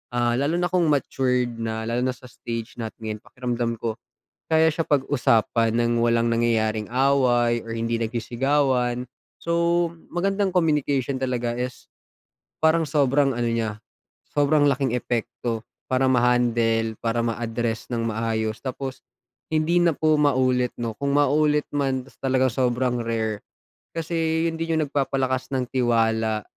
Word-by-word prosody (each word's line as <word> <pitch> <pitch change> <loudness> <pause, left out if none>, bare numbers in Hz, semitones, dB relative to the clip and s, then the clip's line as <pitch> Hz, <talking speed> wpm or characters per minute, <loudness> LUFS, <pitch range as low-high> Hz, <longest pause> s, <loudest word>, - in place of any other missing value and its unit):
ah, 120 0 +2
lalo 145 +4 +1
na 175 0 0
kung 180 -2 +2
matured 125 -4 0
na, 110 0 -3
lalo 115 +2 -1
na 130 0 0
sa - - -24
stage 115 0 -6
natin 110 -1 -5
ngayon, 110 -1 -4
pakiramdam 120 -1 -3
ko 115 0 -4 0.5
kaya 160 0 +4
siya 165 +1 -2
pag-usapan 115 -5 +2
nang 120 0 +1
walang 115 0 +2
nangyayaring 110 -2 +1
away 125 -2 +2
or 115 - -4
hindi 115 0 -1
nagsisigawan. 125 +2 0 0.4
So, 170 0 +1 0.2
magandang 195 +2 -1
communication 145 -5 +1
talaga 125 -2 -1
is, 125 +1 -5 0.7
parang 160 0 +3
sobrang 140 -2 +2
ano 120 - -1
niya, 115 -2 -2 0.5
sobrang 145 +1 +3
laking 135 -2 0
epekto 120 -1 -3 0.2
para 130 +1 +3
ma-handle, 120 -3 +2
para 115 0 0
ma-address 115 0 -2
nang 115 -1 -1
maayos. 110 -1 -1
Tapos 130 0 -5 0.5
hindi 160 +3 +2
na 170 - +4
po 155 0 +2
maulit 130 -4 +2
'no, 115 -2 -3
kung 140 +5 -2
maulit 150 +1 +2
man, 135 -2 -1
ta's - - -19
talagang 130 -1 +2
sobrang 125 0 0
rare, 110 -2 -2 0.5
kasi 165 0 0
yun 165 0 -6
din 165 0 -1
yung 160 - +2
nagpapalakas 135 -2 -1
ng 125 -2 -2
tiwala. 115 -3 +1
125 Hz, 140 wpm, -24 LUFS, 115-145 Hz, 0.7 s, kaya